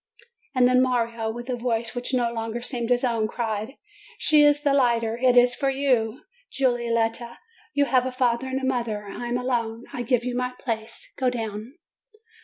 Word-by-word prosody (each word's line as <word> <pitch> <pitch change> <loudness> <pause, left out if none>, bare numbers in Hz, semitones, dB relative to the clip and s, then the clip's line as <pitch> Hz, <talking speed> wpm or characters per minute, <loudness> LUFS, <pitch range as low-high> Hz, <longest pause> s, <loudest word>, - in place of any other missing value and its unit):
And 250 -1 +5
then 255 0 +4
Mario, 235 -3 0
with 240 +2 -6
a 255 - -1
voice 230 -2 -2
which 245 +1 -3
no 240 -2 +1
longer 225 0 -3
seemed 240 -1 -3
his 245 0 +2
own, 230 -3 +1
cried: 220 +2 -3 0.4
"She 305 -1 +5
is 290 0 +4
the 285 -2 +3
lighter! 235 -4 +2
It 250 0 +3
is 245 0 +6
for 275 +3 0
you, 255 -4 0 0.3
Giulietta! 235 -2 0 0.4
You 285 0 +4
have 255 -2 +2
a - - -3
father 250 0 0
and 260 0 -2
mother! 235 -5 -2
I 240 +4 -6
am 240 +1 0
alone! 235 -2 -2
I 245 - -3
give 240 0 +1
you 250 -1 -2
my 250 0 -1
place! 225 -3 -5
Go 260 -2 +2
down!" 225 +1 -5
245 Hz, 185 wpm, -25 LUFS, 230-255 Hz, 0.4 s, is